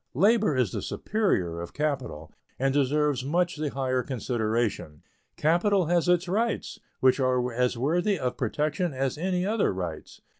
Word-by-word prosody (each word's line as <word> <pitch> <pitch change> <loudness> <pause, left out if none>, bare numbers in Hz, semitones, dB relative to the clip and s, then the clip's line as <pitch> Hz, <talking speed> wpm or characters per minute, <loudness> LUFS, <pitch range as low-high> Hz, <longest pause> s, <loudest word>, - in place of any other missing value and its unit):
Labor 200 - +3
is 120 -7 +1
the - - -3
superior 90 - -1
of 85 - -8
capital, 130 - -3 0.2
and 135 +1 +1
deserves 145 -1 +1
much 175 +4 0
the 150 -1 -2
higher 130 -2 -1
consideration. 115 - -2 0.3
Capital 175 +4 +2
has 175 +1 +1
its 180 0 +3
rights, 220 +5 -1 0.2
which 130 +1 +4
are 125 -2 +1
as 125 0 0
worthy 175 - +1
of 125 -4 -2
protection 150 - -1
as 135 0 -1
any 180 +3 -1
other 215 +1 +1
rights. 90 -5 -6
140 Hz, 150 wpm, -27 LUFS, 125-175 Hz, 0.3 s, which